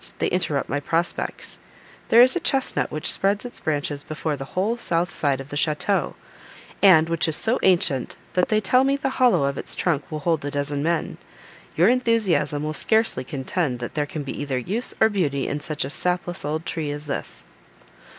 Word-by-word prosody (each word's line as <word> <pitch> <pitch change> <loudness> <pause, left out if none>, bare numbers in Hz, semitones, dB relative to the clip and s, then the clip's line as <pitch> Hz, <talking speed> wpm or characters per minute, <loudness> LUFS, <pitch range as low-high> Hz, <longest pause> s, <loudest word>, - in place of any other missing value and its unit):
they - - 0
interrupt 155 -6 -1
my 145 - -1
prospects. 165 +4 -2 0.5
There 235 +2 +8
is 255 - +5
a - - +1
chesnut 270 -5 0
which 155 - -1
spreads 200 +3 0
its 245 - -6
branches 145 -1 -2
before 155 0 -3
the 135 -1 -7
whole 210 +5 +1
south 175 -6 -1
side 140 -3 0
of 135 +1 -9
the 145 - -6
château, 155 +7 0 0.7
and 165 -5 +6
which 165 -1 +2
is 160 - +3
so 230 +8 +2
ancient 170 -8 +1 0.2
that 180 - +2
they 215 - +2
tell 255 +4 +3
me 275 +1 +2
the 270 -1 -2
hollow 200 - +5
of 140 0 -1
its - - -6
trunk 160 -5 -1
will 155 -1 -4
hold 165 -2 0
a 145 - -2
dozen 145 0 -2
men. 165 +2 -1 0.6
Your 170 +4 +4
enthusiasm 225 -11 +1
will 155 0 -2
scarcely 220 - +2
contend 135 +1 -2
that 120 -1 -6
there 150 -1 -1
can 150 0 -5
be 135 - -6
either 140 -3 -2
use, 200 - -2
or 220 - +6
beauty, 155 -10 -1
in 145 - -2
such 150 -2 -3
a - - -5
sapless 180 +1 -1
old 155 +2 -3
tree 160 -3 -3
as 145 +1 -5
this." 140 - -5
160 Hz, 200 wpm, -23 LUFS, 145-200 Hz, 0.7 s, There